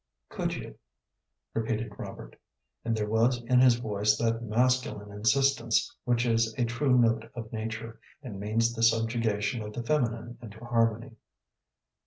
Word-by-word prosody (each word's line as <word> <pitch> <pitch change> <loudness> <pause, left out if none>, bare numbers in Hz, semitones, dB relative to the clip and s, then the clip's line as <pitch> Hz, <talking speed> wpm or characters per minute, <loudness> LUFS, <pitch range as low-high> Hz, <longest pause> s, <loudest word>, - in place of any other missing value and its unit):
"Could - - -2
you?" - - -9 0.7
repeated 110 -1 -2
Robert, - - -9 0.5
and 115 -1 -1
there 105 -1 -1
was 115 +3 +2
in 125 +1 +3
his 125 -2 +6
voice 105 -2 +1
that 115 0 0
masculine 120 -2 0
insistence 115 +3 +1
which 120 0 +1
is 115 -1 +1
a 120 - +2
true 125 +3 +2
note 115 -1 +2
of 115 -2 -7
nature, 110 +1 -5 0.2
and 105 -7 -7
means 115 +3 +1
the 115 - -5
subjugation 115 0 +1
of 105 0 -7
the 120 - -4
feminine 120 -3 -1
into 110 -3 -10
harmony. 115 0 -1
115 Hz, 145 wpm, -28 LUFS, 110-120 Hz, 0.7 s, his